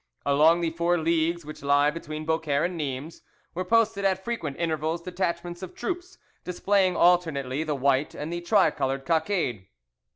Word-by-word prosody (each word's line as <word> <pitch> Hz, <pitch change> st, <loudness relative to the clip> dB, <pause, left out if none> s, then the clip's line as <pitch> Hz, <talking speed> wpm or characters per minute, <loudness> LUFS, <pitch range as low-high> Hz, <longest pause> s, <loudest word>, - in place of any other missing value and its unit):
Along 155 Hz, +4 st, +4 dB
the 165 Hz, -1 st, 0 dB
four 170 Hz, +2 st, +1 dB
leagues 165 Hz, 0 st, 0 dB
which 155 Hz, -, -9 dB
lie 145 Hz, +1 st, +3 dB
between 155 Hz, -1 st, -6 dB
Beaucaire 160 Hz, -3 st, 0 dB
and 180 Hz, 0 st, -3 dB
Nimes 145 Hz, 0 st, -5 dB, 0.3 s
were 185 Hz, -, -2 dB
posted 215 Hz, 0 st, +2 dB
at 190 Hz, -1 st, +1 dB
frequent 165 Hz, -13 st, -3 dB
intervals 160 Hz, 0 st, -1 dB
detachments 175 Hz, -1 st, -3 dB
of 185 Hz, -1 st, -8 dB
troops 360 Hz, 0 st, -5 dB, 0.3 s
displaying 185 Hz, +1 st, +1 dB
alternately 160 Hz, -6 st, +2 dB
the 155 Hz, -2 st, -2 dB
white 140 Hz, +1 st, +1 dB
and 155 Hz, +3 st, -5 dB
the 175 Hz, -, -3 dB
tricoloured 135 Hz, -8 st, +1 dB
cockade. 160 Hz, -, 0 dB
165 Hz, 155 wpm, -26 LUFS, 150-180 Hz, 0.3 s, Along